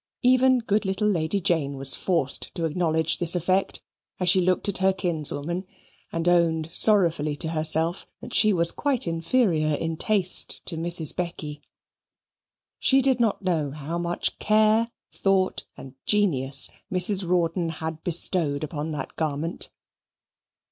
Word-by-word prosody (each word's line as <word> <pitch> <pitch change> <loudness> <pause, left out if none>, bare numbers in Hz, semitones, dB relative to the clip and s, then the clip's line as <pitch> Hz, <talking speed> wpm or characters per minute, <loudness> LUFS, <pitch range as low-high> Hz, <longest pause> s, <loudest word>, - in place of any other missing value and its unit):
Even 255 +1 +4
good 215 -3 -1
little 195 +2 -1
Lady 175 -1 0
Jane 155 -6 -1
was 135 0 +3
forced 165 -8 -2
to 170 -3 -2
acknowledge 160 -1 0
this 175 0 +2
effect, 185 +3 -1 0.4
as 180 -1 +1
she 185 +1 +5
looked 185 +2 0
at 200 - +1
her 190 0 +3
kinswoman, 170 -1 -2 0.5
and 165 +1 -3
owned 165 -2 +1
sorrowfully 170 -8 +2
to 160 +2 -3
herself 160 +2 +1
that - - -10
she 215 - +4
was 170 -3 +3
quite 280 -4 0
inferior 165 -2 0
in 165 +1 -4
taste 195 -3 +1
to 170 - -6
Mrs. 165 -1 +1
Becky. 155 -4 -5 1.2
She 270 0 +3
did 260 -2 +2
not 220 -3 0
know 165 -6 -1
how 150 +4 -5
much 175 0 -3
care, 215 +2 +2 0.2
thought, 190 -1 0
and 130 - -11
genius 140 -10 +2 0.2
Mrs. 190 0 +1
Rawdon 170 -1 0
had 160 0 -6
bestowed 165 -4 +4
upon 155 0 -5
that 145 -3 -6
garment. 155 +1 -3
170 Hz, 140 wpm, -24 LUFS, 160-195 Hz, 1.2 s, she